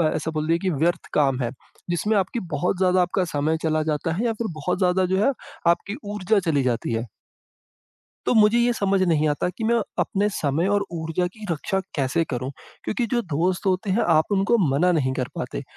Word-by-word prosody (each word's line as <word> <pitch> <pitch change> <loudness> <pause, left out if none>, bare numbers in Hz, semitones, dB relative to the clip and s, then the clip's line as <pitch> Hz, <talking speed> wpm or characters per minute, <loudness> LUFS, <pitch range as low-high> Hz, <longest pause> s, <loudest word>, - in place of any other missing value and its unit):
ऐसा 160 +1 -2
बोल 155 -1 -2
दिया 165 - +3
है - - -2
कि 190 - -1
व्यर्थ 165 +2 0
काम 135 -3 +2
है, 120 - 0 0.4
जिसमें 210 +5 +1
आपकी 195 +5 0 0.2
बहुत 180 +5 0
ज़्यादा 185 0 +3
आपका 180 +2 +1
समय 155 0 0
चला 155 -1 +1
जाता 155 +1 -1
है 210 +8 -1
या 230 - +1
फिर 225 +1 -3
बहुत 165 +5 -1
ज़्यादा 185 0 +2
जो - - +3
है 275 - +4 0.4
आपकी 185 +4 +1 0.2
ऊर्जा 210 +1 +2
चली 145 -4 +2
जाती 120 -2 -1
है। 115 +2 -2 1.2
तो - - +2
मुझे 215 +1 +5
ये 240 +1 +3
समझ 195 -3 +1
नहीं 155 -4 +2
आता 145 +4 0
कि 220 - -7
मैं 235 +1 +3 0.2
अपने 205 +1 +1
समय 160 -2 0
और 200 0 0
ऊर्जा 165 +1 -2
की 220 -1 -10
रक्षा 180 +5 -1 0.2
कैसे 145 +4 +1
करूँ? 130 +1 -3 0.3
क्योंकि 240 +2 -1
जो 240 -1 +2
दोस्त 175 +2 -1
होते 190 +2 0
हैं 200 +5 +2
आप 160 +3 +3
उनको 200 +4 +3
मना 165 +7 +3
नहीं 135 -6 +1
कर 130 -1 -2
पाते। - - -4
175 Hz, 210 wpm, -24 LUFS, 155-200 Hz, 1.2 s, मुझे